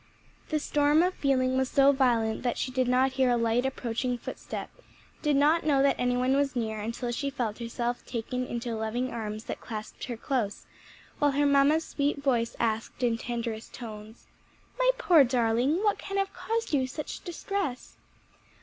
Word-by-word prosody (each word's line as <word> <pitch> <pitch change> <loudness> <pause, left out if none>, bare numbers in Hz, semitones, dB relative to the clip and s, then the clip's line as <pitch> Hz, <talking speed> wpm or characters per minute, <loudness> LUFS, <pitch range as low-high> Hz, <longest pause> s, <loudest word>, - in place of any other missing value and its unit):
The 310 - +1
storm 295 +1 +3
of 365 +1 +1
feeling 260 -3 +1
was 260 0 +1
so 275 0 +5
violent 235 -5 +1
that 245 - -1
she 255 - -2
did 255 -1 +1
not 255 +2 +3
hear 260 -1 +2
a 240 - +3
light, 230 +2 +1
approaching 250 -1 -2
footstep, - - -6 0.5
did 300 -2 +2
not 300 +4 +4
know 280 -3 +3
that 280 - +4
any 245 0 +1
one 255 +2 +2
was 275 -1 +1
near 220 -3 -2
until 230 +3 -3
she 280 +4 -2
felt 245 -6 -3
herself 235 +1 -3
taken 250 +1 -3
into 235 0 -3
loving 225 +3 -2
arms 215 -2 -4
that - - -6
clasped 215 -2 -6
her 240 -3 -5
close, 235 -5 -2 0.5
while 290 -1 +3
her 290 +1 +2
mamma's 285 +3 +4
sweet 285 0 -1
voice 250 -5 0
asked 225 +2 -1
in 235 -2 +3
tenderest 230 -1 -4
tones, 220 -2 -9 0.5
"my - - +4
poor 345 - +6
darling, 250 - +1
what 415 -1 +2
can 395 0 -4
have 390 0 0
caused 455 -5 -3
you 265 -3 +2
such 295 +3 -6
distress?" 350 -6 -4
255 Hz, 175 wpm, -28 LUFS, 235-285 Hz, 0.5 s, poor